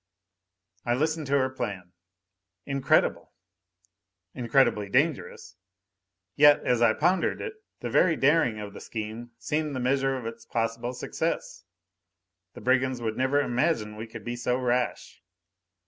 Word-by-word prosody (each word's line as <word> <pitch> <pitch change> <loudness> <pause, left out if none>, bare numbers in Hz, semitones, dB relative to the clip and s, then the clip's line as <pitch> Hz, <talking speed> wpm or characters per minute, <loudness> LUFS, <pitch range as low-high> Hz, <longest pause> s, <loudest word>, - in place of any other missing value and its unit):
I 120 - +1
listened 155 +2 -1
to 140 +1 +3
her 130 -1 +1
plan. 95 -8 -5 0.7
Incredible! 140 -1 +1 1.0
Incredibly 120 -4 +2
dangerous. 125 - -1 0.8
Yet, 145 0 +6
as 120 -1 +2
I 115 -2 +4
pondered 175 +3 +1
it, 440 - -5 0.3
the - - -3
very 165 -3 +4
daring 140 -7 +2
of 105 -1 -7
the - - -10
scheme 110 +2 -6
seemed 150 +3 -2
the - - -2
measure 135 +1 +1
of 125 - -7
its 115 0 -7
possible 115 +1 -2
success. - - -3 0.9
The - - -9
brigands 130 +2 +1
would 110 -2 -2
never 130 +3 +2
imagine 120 -4 0
we 110 +2 -7
could 115 -1 -10
be 120 +2 -4
so 125 +1 0
rash! 125 -1 -2
125 Hz, 135 wpm, -27 LUFS, 115-140 Hz, 1.0 s, Yet